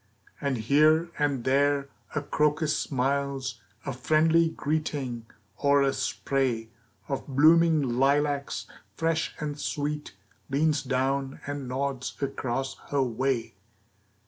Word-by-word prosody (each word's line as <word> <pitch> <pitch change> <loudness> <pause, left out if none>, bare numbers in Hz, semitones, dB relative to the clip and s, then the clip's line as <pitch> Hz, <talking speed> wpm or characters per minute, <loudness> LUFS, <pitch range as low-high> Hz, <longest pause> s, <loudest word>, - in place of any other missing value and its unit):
And 140 -3 0
here 155 +8 +4
and 140 -4 +1
there 140 +1 +2 0.3
a 150 - 0
crocus 150 +1 +1
smiles 135 -2 -1 0.2
A 135 - -2
friendly 160 +5 +3
greeting, 140 -7 -3 0.3
or 140 -1 +4
a 135 0 +2
spray 125 -5 -1 0.4
Of 135 -1 -3
blooming 160 +3 +5 0.2
lilacs, 140 +1 +1 0.3
fresh 165 0 0
and 150 -1 -4
sweet, 150 -6 -3 0.3
Leans 145 +2 +2
down 135 +1 -1
and 145 -2 -4
nods 130 0 -3
across 135 -1 -2
her 140 -1 +2
way. 125 0 -1
140 Hz, 110 wpm, -27 LUFS, 135-150 Hz, 0.4 s, blooming